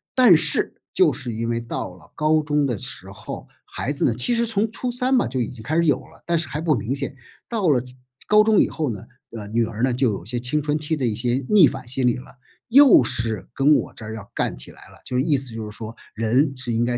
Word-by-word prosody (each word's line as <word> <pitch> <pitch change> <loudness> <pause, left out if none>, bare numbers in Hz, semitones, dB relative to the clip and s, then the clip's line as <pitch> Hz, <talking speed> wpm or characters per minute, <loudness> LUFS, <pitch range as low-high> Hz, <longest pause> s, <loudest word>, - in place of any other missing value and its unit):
但 245 -9 +7
是 - - +6 0.2
就 370 - +3
是 125 -5 -5
因 115 +1 -3
为 115 0 -2
到 115 -5 -6
了 85 -2 -19
高 155 +1 +2
中 150 -1 0
的 120 -5 -2
时 - - -5
候， - - -9 0.2
孩 135 - -4
子 140 - -1
呢 120 - +2
其 125 - +1
实 235 0 +1
从 220 0 0
初 245 +2 -4
三 250 +2 +1
吧 245 - +2
就 130 +2 -4
已 120 - -2
经 120 -3 -12
开 150 +8 -3
始 170 0 +2
有 145 - +3
了， - - -21
但 170 -1 0
是 155 -5 -3
还 145 +3 -4
不 160 -2 +1
明 115 +2 -2
显， 140 0 -2 0.3
到 210 -8 0
了 125 -4 +2 0.4
高 210 0 +5
中 215 -2 +3
以 - - +4
后 155 -4 -3
呢， 105 -5 -7 0.3
呃， 105 -1 -8
女 115 +2 0
儿 115 +1 -5
呢 130 -2 +2
就 125 -2 +1
有 100 - -6
一 - - -9
些 120 +2 -1
青 125 +5 0
春 150 0 -1
期 155 +1 -1
的 130 - -2
一 115 - 0
些 120 +4 -1
逆 195 -8 +7
反 - - -6
心 130 0 +2
理 120 - +2
了， 125 - -13 0.3
又 270 - +7
是 110 -5 -1
跟 145 +3 +4
我 - - -2
这 - - -12
儿 110 +1 -7
要 105 -2 -10
干 - - -2
起 - - -6
来 - - -16
了， - - -18
就 125 - -5
是 125 - +2
意 145 -1 +1
思 130 -3 -3
就 110 -1 -6
是 105 - -10
说 110 0 -8 0.2
人 125 +6 +1
是 120 -2 -4
应 115 +1 +1
该 120 0 -1
130 Hz, 295 characters per minute, -22 LUFS, 115-155 Hz, 0.4 s, 但